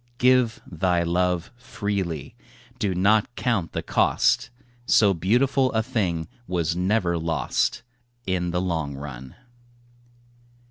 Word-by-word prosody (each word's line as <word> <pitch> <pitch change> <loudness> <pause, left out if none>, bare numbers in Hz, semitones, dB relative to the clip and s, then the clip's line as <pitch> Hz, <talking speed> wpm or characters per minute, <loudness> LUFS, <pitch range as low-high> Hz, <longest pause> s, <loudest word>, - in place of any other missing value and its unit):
Give 125 -2 +3
thy 90 0 0
love 90 +1 0
freely; 100 - -4 0.4
do 95 -3 0
not 105 +5 +2
count 110 -10 -1
the - - -3
cost; - - +2 0.4
So 100 -3 +5
beautiful 130 +9 +2
a 110 0 +1
thing 95 -10 -1 0.2
was 85 -2 -1
never 90 -2 +1
lost 80 +6 -1 0.4
In 90 -2 -1
the 90 +1 -1
long 80 -6 -2
run. 65 -2 -8
90 Hz, 110 wpm, -24 LUFS, 85-110 Hz, 0.4 s, So